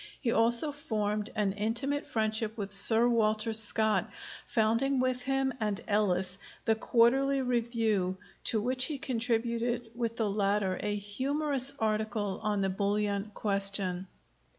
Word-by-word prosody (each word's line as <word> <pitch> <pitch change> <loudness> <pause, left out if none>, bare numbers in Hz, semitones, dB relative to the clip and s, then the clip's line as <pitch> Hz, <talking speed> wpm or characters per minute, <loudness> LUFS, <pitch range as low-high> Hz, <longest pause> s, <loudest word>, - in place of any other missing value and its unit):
He 240 - -1
also 235 +6 +4
formed 215 -6 -2
an 210 -3 +1
intimate 235 +8 -2
friendship 220 0 -1
with 200 -2 -5
Sir 225 +4 +5
Walter 220 -1 +1
Scott, 220 0 +3 0.4
founding 235 +4 +1
with 255 0 0
him 270 0 0
and 210 -2 -1
Ellis 190 -2 0 0.3
the 225 - +3
Quarterly 260 +5 +2
Review, 225 -6 0 0.3
to 220 - +2
which 255 +3 +2
he 300 0 -3
contributed 235 -2 -2
with 230 -1 -3
the 225 - 0
latter 200 -2 0
a 205 0 -2
humorous 270 +6 -1
article 215 -2 -2
on 210 -1 -1
the 195 - 0
bullion 205 +1 -1
question. 195 -2 -1
220 Hz, 130 wpm, -30 LUFS, 205-245 Hz, 0.4 s, Sir